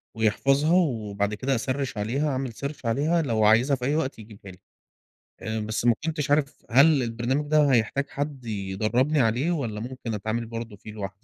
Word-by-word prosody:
ويحفظها 135 Hz, -, +2 dB
وبعد 105 Hz, -, 0 dB
كده 130 Hz, +5 st, -1 dB
أسَرِّش 130 Hz, 0 st, -2 dB
عليها 130 Hz, +9 st, -1 dB
أعمل 130 Hz, -3 st, -3 dB
search 140 Hz, 0 st, -6 dB
عليها 150 Hz, +9 st, +1 dB
لو 115 Hz, -7 st, 0 dB
عايزها 120 Hz, +6 st, +4 dB
في 125 Hz, -1 st, -5 dB
أي 145 Hz, +3 st, +1 dB
وقت 135 Hz, -7 st, -2 dB
يجيبها 105 Hz, -3 st, -12 dB
لي. 90 Hz, -, -15 dB, 0.8 s
آآ 110 Hz, 0 st, -3 dB
بس 110 Hz, +2 st, -3 dB
ما 120 Hz, -1 st, +5 dB
كنتش 155 Hz, -3 st, -2 dB
عارف 145 Hz, -1 st, 0 dB
هل 140 Hz, +2 st, +5 dB
البرنامج 120 Hz, +5 st, -1 dB
ده 150 Hz, -3 st, +4 dB
هيحتاج 125 Hz, +4 st, +1 dB
حد 140 Hz, -3 st, -4 dB
يدرّبني 110 Hz, +8 st, 0 dB
عليه 120 Hz, +8 st, +1 dB
والّا 115 Hz, -10 st, -2 dB
ممكن 120 Hz, -2 st, -5 dB
أتعامل 110 Hz, +3 st, -3 dB
برضه 115 Hz, -2 st, -7 dB
فيه 105 Hz, +1 st, -11 dB
لوحدي؟ 100 Hz, -2 st, -5 dB
125 Hz, 175 wpm, -25 LUFS, 110-140 Hz, 0.8 s, ما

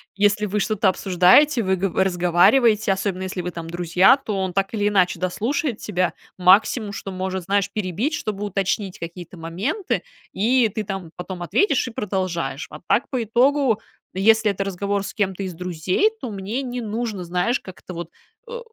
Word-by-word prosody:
если 205 Hz, +1 st, +2 dB
вы 210 Hz, +1 st, -1 dB
что-то 210 Hz, -1 st, +2 dB
обсуждаете, 195 Hz, -, +4 dB
вы 190 Hz, 0 st, +1 dB
гово 190 Hz, 0 st, +1 dB
разговариваете, 195 Hz, +5 st, +3 dB
особенно, 190 Hz, -1 st, -1 dB
если 185 Hz, 0 st, -4 dB
вы 180 Hz, -, -4 dB
там 165 Hz, -1 st, -7 dB
друзья, 175 Hz, +6 st, +4 dB
то 220 Hz, -7 st, -4 dB
он 190 Hz, -1 st, -1 dB
так 195 Hz, +2 st, -1 dB
или 205 Hz, -2 st, +1 dB
иначе 185 Hz, -4 st, +2 dB
дослушает 230 Hz, -, -1 dB
тебя, 185 Hz, -3 st, -1 dB, 0.2 s
максимум, 200 Hz, +4 st, +4 dB
что 200 Hz, -, -6 dB
может, 185 Hz, -1 st, -4 dB
знаешь, 200 Hz, 0 st, +1 dB
перебить, 215 Hz, -, -2 dB
чтобы 210 Hz, -8 st, -3 dB
уточнить 195 Hz, -1 st, -2 dB
какие-то 175 Hz, +1 st, -8 dB
моменты, 195 Hz, -, -2 dB, 0.3 s
и 235 Hz, +4 st, +3 dB
ты 215 Hz, +1 st, -4 dB
там 195 Hz, -5 st, -6 dB
потом 180 Hz, 0 st, -7 dB
ответишь 275 Hz, -, +1 dB
и 245 Hz, -, -6 dB
продолжаешь. 180 Hz, -10 st, -3 dB
А 150 Hz, -, -10 dB
так, 255 Hz, -, +2 dB
по 255 Hz, -3 st, -1 dB
итогу, 245 Hz, +1 st, +2 dB, 0.3 s
если 220 Hz, +2 st, +4 dB
это 195 Hz, 0 st, -3 dB
разговор 200 Hz, +1 st, -2 dB
с -, -, -6 dB
кем-то 195 Hz, -2 st, -1 dB
из 185 Hz, -, -4 dB
друзей, 180 Hz, -, 0 dB
то 250 Hz, -, -5 dB
мне 205 Hz, +6 st, -3 dB
не 245 Hz, -1 st, -4 dB
нужно, 220 Hz, -3 st, -3 dB
знаешь, 180 Hz, +9 st, 0 dB
как-то 185 Hz, 0 st, -10 dB
вот, 170 Hz, -1 st, -6 dB, 0.4 s
э, 485 Hz, 0 st, -5 dB
195 Hz, 175 wpm, -22 LUFS, 180-220 Hz, 0.4 s, обсуждаете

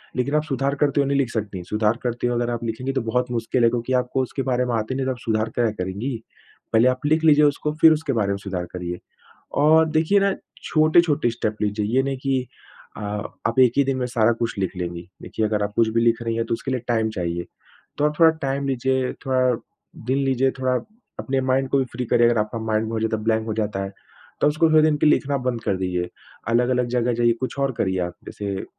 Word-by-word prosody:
लेकिन 135 Hz, +3 st, 0 dB
आप 150 Hz, -, +2 dB
सुधार 140 Hz, -1 st, -1 dB
करते 145 Hz, -1 st, +2 dB
हुए 140 Hz, -, 0 dB
नहीं 140 Hz, -, +1 dB
लिख 135 Hz, -4 st, +1 dB
सकती। 100 Hz, -5 st, -4 dB
सुधार 110 Hz, +1 st, +1 dB
करते 120 Hz, 0 st, -1 dB
हो 120 Hz, -, 0 dB
अगर 120 Hz, 0 st, 0 dB
आप 120 Hz, -, -4 dB
लिखेंगी 120 Hz, +4 st, -3 dB
तो 135 Hz, -, 0 dB
बहुत 125 Hz, +2 st, -1 dB
मुश्किल 120 Hz, +1 st, 0 dB
है 115 Hz, -, +6 dB
क्योंकि 120 Hz, +2 st, -2 dB
आपको 125 Hz, +1 st, -2 dB
उसके 130 Hz, +2 st, -4 dB
बारे 125 Hz, 0 st, +1 dB
में 125 Hz, -, -2 dB
आता 110 Hz, -1 st, -1 dB
ही -, -, -4 dB
नहीं 135 Hz, 0 st, -1 dB
तो 130 Hz, -, 0 dB
आप 125 Hz, -, -5 dB
सुधार 110 Hz, -1 st, -1 dB
क्या 120 Hz, -2 st, +2 dB
करेंगी। 100 Hz, +8 st, -3 dB, 0.6 s
पहले 115 Hz, +2 st, +5 dB
आप 130 Hz, +2 st, 0 dB
लिख 155 Hz, +2 st, +2 dB
लीजिए 150 Hz, -2 st, +6 dB
उसको 145 Hz, +1 st, 0 dB
फिर 160 Hz, -, +9 dB
उसके 150 Hz, -3 st, -2 dB
बारे 105 Hz, -3 st, 0 dB
में 100 Hz, -, -1 dB
सुधार 95 Hz, -3 st, -4 dB
करिए। 90 Hz, -1 st, -5 dB, 0.6 s
और 160 Hz, +2 st, +6 dB
देखिए 160 Hz, +6 st, +3 dB
ना, 195 Hz, 0 st, +1 dB, 0.3 s
छोटे-छोटे 155 Hz, -4 st, +3 dB
स्टेप 110 Hz, -2 st, -2 dB
लीजिए, 105 Hz, 0 st, 0 dB
ये 130 Hz, +5 st, +2 dB
नहीं 135 Hz, 0 st, -2 dB
कि 130 Hz, -1 st, -1 dB, 0.5 s
अ, -, -, -7 dB, 0.5 s
आप 115 Hz, +3 st, 0 dB
एक 125 Hz, -2 st, +6 dB
ही 140 Hz, -, +5 dB
दिन 135 Hz, -1 st, 0 dB
में 125 Hz, -, -1 dB
सारा 120 Hz, -2 st, +2 dB
कुछ 115 Hz, -2 st, -2 dB
लिख 95 Hz, 0 st, -2 dB
लेंगी। 85 Hz, -1 st, -5 dB, 0.2 s
देखिए 110 Hz, -, -2 dB
अगर 105 Hz, -1 st, 0 dB
आप 105 Hz, -, -3 dB
कुछ 115 Hz, -1 st, +3 dB
भी -, -, +4 dB
लिख 115 Hz, 0 st, +2 dB
रही 115 Hz, -1 st, -1 dB
हैं 115 Hz, 0 st, -1 dB
तो 115 Hz, -, -2 dB
उसके 130 Hz, +3 st, -4 dB
लिए 130 Hz, -, 0 dB
टाइम 110 Hz, -2 st, +1 dB
चाहिए, 85 Hz, -3 st, -3 dB, 0.5 s
तो 145 Hz, -, 0 dB
आप 150 Hz, -, +1 dB
थोड़ा 165 Hz, -1 st, +8 dB
टाइम 140 Hz, +1 st, -1 dB
लीजिए, 130 Hz, 0 st, 0 dB
थोड़ा 130 Hz, -1 st, +2 dB, 0.5 s
दिन 130 Hz, +2 st, +1 dB
लीजिए, 135 Hz, 0 st, +2 dB
थोड़ा 130 Hz, -1 st, +1 dB, 0.5 s
अपने 135 Hz, -1 st, -1 dB
माइंड 130 Hz, +1 st, +1 dB
को 140 Hz, -, +2 dB
भी 130 Hz, -, +1 dB
फ्री 125 Hz, +1 st, -3 dB
करिए 120 Hz, +1 st, +4 dB
अगर 120 Hz, -, +2 dB
आपका 105 Hz, +2 st, -2 dB
माइंड 110 Hz, 0 st, -1 dB
बहुत 110 Hz, -1 st, -2 dB
ज़्यादा 110 Hz, 0 st, 0 dB
ब्लैंक 110 Hz, 0 st, +1 dB
हो 110 Hz, -, -1 dB
जाता 105 Hz, -2 st, -2 dB
है, 95 Hz, -, -5 dB, 0.5 s
तो -, -, +5 dB
उसको 155 Hz, +2 st, +3 dB
थोड़े 155 Hz, 0 st, +6 dB
दिन 155 Hz, -1 st, +3 dB
के 150 Hz, -, +1 dB
लिए 150 Hz, -, +6 dB
लिखना 140 Hz, 0 st, 0 dB
बंद 120 Hz, -2 st, -1 dB
कर 100 Hz, -3 st, 0 dB
दीजिए। 90 Hz, -1 st, -2 dB, 0.4 s
अलग-अलग 125 Hz, +1 st, +2 dB
जगह 120 Hz, 0 st, +1 dB
जाइए, 120 Hz, 0 st, +3 dB
कुछ 130 Hz, -, -3 dB
और 140 Hz, -1 st, +1 dB
करिए 95 Hz, -1 st, 0 dB
आप, 85 Hz, -, -10 dB
जैसे 100 Hz, -2 st, -5 dB
120 Hz, 240 wpm, -23 LUFS, 110-135 Hz, 0.6 s, फिर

